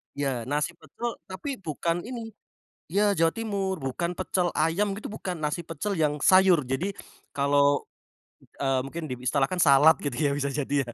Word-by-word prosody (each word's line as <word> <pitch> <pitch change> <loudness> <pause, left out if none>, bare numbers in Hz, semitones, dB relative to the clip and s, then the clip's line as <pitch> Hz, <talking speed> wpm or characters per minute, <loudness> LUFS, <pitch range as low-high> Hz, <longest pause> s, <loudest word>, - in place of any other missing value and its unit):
Ya 135 -5 -2
nasi 150 +5 0
pecel 235 +5 -6
tapi 250 +8 -5
bukan 170 0 -2
ini 230 -2 -6 0.6
ya 205 +3 +3
Jawa 165 0 +3
Timur 200 -4 -2
bukan 170 +7 -3
pecel 180 -1 0
ayam 175 +6 +1
gitu 215 - -6
bukan 185 -4 -5
nasi 150 +3 -1
pecel 165 +6 -3
yang 150 -2 0
sayur 185 -3 +6
jadi, 155 +11 -2 0.4
kalau, 140 0 +3 0.8
eee 135 -2 +1
mungkin 160 +4 -5
diistilahkan 135 +7 0
salad 145 +2 +7
gitu 145 -4 -2
ya 140 - +2
bisa 140 0 -1
jadi 145 0 -2
ya. - - -7
165 Hz, 160 wpm, -27 LUFS, 140-190 Hz, 0.8 s, salad